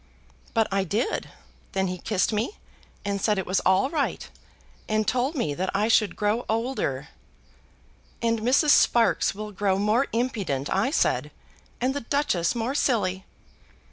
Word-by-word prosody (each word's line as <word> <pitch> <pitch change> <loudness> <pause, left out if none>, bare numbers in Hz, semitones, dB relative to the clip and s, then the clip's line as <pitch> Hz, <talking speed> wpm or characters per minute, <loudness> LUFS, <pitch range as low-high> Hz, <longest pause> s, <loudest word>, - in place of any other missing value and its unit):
"But 225 -1 +3
I 195 0 +1
did. 210 +7 -2 0.4
Then 190 0 +1
he 180 -1 -3
kissed 205 +2 0
me, 225 - -2 0.5
and 200 -1 -2
said 210 -1 +2
it 190 - -2
was 185 +1 +1
all 190 +8 +2
right, 300 -4 -2 0.6
and 215 0 +1
told 255 +5 0
me 160 - -1
that 185 +5 -2
I 210 +3 +2
should 215 -5 +3
grow 210 +3 0
older. 220 - -2 1.1
'And 230 -1 +1
Mrs. 260 +6 +3
Sparkes 235 -6 +4
will 210 +1 -6
grow 195 -1 0
more 215 +7 +2
impudent,' 200 - -2
I 195 +7 +2
said, 300 - +1 0.5
'and 255 +2 +1
the 285 - -3
Duchess 230 - 0
more 235 +3 -1
silly.' 195 -10 0
215 Hz, 150 wpm, -25 LUFS, 190-245 Hz, 1.1 s, Sparkes